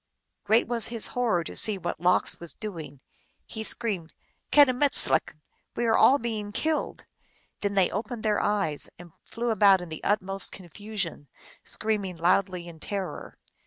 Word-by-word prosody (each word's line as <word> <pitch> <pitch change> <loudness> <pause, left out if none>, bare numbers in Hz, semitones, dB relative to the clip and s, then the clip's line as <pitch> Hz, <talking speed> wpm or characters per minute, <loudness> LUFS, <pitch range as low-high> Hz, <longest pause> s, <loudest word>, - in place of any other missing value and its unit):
Great 225 +2 +3
was 235 -1 +3
his 230 -2 +2
horror 230 -9 +1
to - - -8
see 215 -2 +3
what 185 - -5
Lox 180 +1 +2
was 170 -3 -5
doing! 160 - -8 0.4
He 220 - -6
screamed, 205 -8 -1 0.2
" - - -47
Kedumed^lk! 265 - +4 0.2
" - - -46
"We 240 - -1
are 225 -1 +3
all 275 - +6
being 220 -4 -4
killed! 305 +8 -2 0.3
" - - -39
Then 200 -1 -1
they 190 -2 +3
opened 220 +3 -5
their 210 -2 +1
eyes, 195 -8 0
and 175 -1 -13
flew 235 0 -3
about 200 -3 +5
in 180 -1 -8
the 155 - -8
utmost 195 -2 0
confusion, 190 -3 -6 0.4
screaming 205 -5 -3
loudly 180 +1 +1
in 165 -2 -11
terror. 195 +3 -6
205 Hz, 160 wpm, -26 LUFS, 175-225 Hz, 0.4 s, all